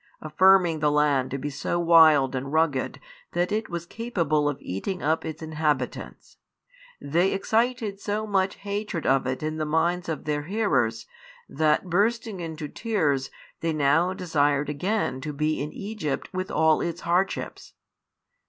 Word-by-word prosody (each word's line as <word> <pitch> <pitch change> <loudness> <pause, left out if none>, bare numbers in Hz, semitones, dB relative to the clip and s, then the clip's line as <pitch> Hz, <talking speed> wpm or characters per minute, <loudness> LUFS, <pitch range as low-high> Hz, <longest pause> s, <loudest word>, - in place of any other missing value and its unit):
Affirming 175 +1 +4
the 150 0 +2
land 145 -3 +2
to 135 - -3
be 145 +2 -4
so 145 +5 -2
wild 160 -6 +6
and 135 +1 -4
rugged 155 -4 0 0.3
that 175 +2 0
it 215 +1 -1
was 170 -1 -4
capable 170 -10 0
of 145 - -3
eating 140 - -4
up 160 +2 +1
its 160 0 -6
inhabitants, 150 -5 -3 0.6
they 170 +7 +1
excited 220 0 0
so 210 +2 -2
much 195 -2 0
hatred 205 -3 -4
of 135 -1 +2
it 130 +3 -3
in 155 0 -2
the 155 - -1
minds 170 +3 0
of 160 - -3
their 150 -1 -1
hearers, 145 - 0 0.4
that 155 +4 +1
bursting 215 +3 0
into 160 -2 -5
tears 150 - -1 0.3
they 165 -1 -1
now 155 +4 +2
desired 145 -6 0
again 165 -2 -1
to 150 +2 -4
be 150 +1 -1
in 150 +1 -4
Egypt 200 -9 -4
with 185 0 -3
all 160 -1 +3
its 170 +1 -3
hardships. 180 +3 -2
160 Hz, 155 wpm, -25 LUFS, 145-190 Hz, 0.6 s, wild